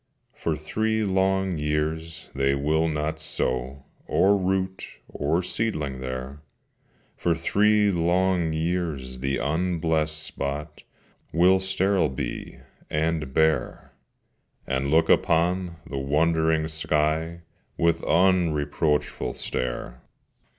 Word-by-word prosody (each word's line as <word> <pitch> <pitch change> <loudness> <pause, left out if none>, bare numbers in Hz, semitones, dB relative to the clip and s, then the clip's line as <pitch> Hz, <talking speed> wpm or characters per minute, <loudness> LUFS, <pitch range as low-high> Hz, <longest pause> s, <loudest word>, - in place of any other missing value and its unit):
For 80 -2 -2
three 110 +8 -1
long 95 -2 +1
years 80 +2 -2
they 70 0 +1
will 80 +3 +1
not 80 0 -2
sow 65 -3 -2 0.2
Or 100 +2 +4
root 95 0 -2
or 80 +5 -1
seedling 75 - -2
there: 65 +2 -6 0.7
For 85 -1 +1
three 105 +5 +3
long 90 0 +1
years 80 -6 -2
the 70 +1 -1
unblessed 80 -1 0
spot 75 0 -5 0.5
Will 90 +3 +5
sterile 95 -3 +1
be 65 - -5 0.3
and 75 -2 -1
bare, 80 +2 0 0.7
And 70 +1 -1
look 80 +2 +4
upon 85 +2 +2
the 70 - -4
wondering 80 +3 +2
sky 80 +1 -1 0.4
With 85 0 +2
unreproachful 80 -5 +1
stare. - - -4
80 Hz, 100 wpm, -25 LUFS, 75-90 Hz, 0.7 s, Will